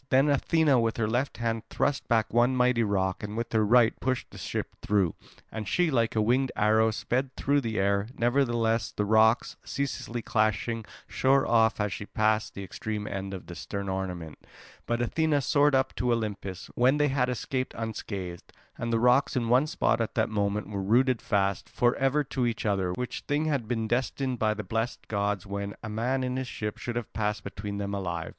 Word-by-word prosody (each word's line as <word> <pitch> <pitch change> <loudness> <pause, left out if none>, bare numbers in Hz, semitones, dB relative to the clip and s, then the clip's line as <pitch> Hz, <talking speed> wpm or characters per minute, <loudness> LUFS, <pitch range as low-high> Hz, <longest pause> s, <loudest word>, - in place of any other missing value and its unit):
Then 135 +3 +4
Athena 145 -1 +3
with 115 -1 0
her 110 -2 +1
left 125 +5 -1
hand 115 -1 -1
thrust 145 -1 0
back 110 -3 +1
one 120 +2 +4
mighty 125 -1 +3
rock 95 -3 0
and 105 +1 -5
with 115 0 -3
her 110 -1 +3
right 115 +1 +5
pushed 130 0 -2
the - - -10
ship - - -4
through; 100 -6 +1 0.4
and 110 -2 -5
she, 175 - +2
like 115 -4 +1
a 110 - +3
winged 125 +4 +2
arrow, 110 +1 +3
sped 130 +4 -2
through 140 +1 +1
the 110 -3 -3
air. 100 +1 +1
Nevertheless 120 -2 +1
the 105 - -1
rocks, 110 +2 +3
ceaselessly 120 -4 -3
clashing, 110 +1 0 0.2
shore 135 +1 +2
off 115 -1 +3
as 105 -2 0
she 100 - -6
passed 110 0 0
the 100 - -5
extreme 105 +3 -4
end 95 -1 -4
of 95 -2 -7
the 90 - -8
stern 100 +3 -5
ornament. 90 -5 -4 0.5
But 120 +1 0
Athena 155 +4 +1
soared 145 +1 +3
up 130 0 +1
to 125 -1 +1
Olympus, 105 -5 -3
when 130 +4 +3
they 150 0 +3
had 130 -2 +1
escaped 130 +1 -3
unscathed. 100 -5 -5 0.3
And 115 - -2
the 115 - +3
rocks 125 +5 +3
in 120 -3 0
one 130 +5 +4
spot 115 - +1
at 115 - -3
that 110 - +1
moment 105 -1 -1
were 100 -2 -4
rooted 120 +5 +3
fast 100 -2 0
for 120 0 +2
ever 135 +2 +2
to 130 -2 -1
each 115 -1 -3
other, 95 -3 +1
which 125 +5 -4
thing 145 +2 +1
had 140 -8 -1
been 115 -2 -1
destined 130 +1 -1
by 110 -2 +2
the 105 - -5
blessed 115 +5 -3
gods, 100 -2 -1
when 100 0 -4
a 110 - -5
man 125 +5 -1
in 125 0 -2
his 130 -1 -3
ship 105 -3 -5
should 120 - -4
have 120 -2 -4
passed 105 -2 -1
between 100 +1 -5
them 100 0 -3
alive. 85 -4 -3
115 Hz, 200 wpm, -28 LUFS, 105-125 Hz, 0.5 s, right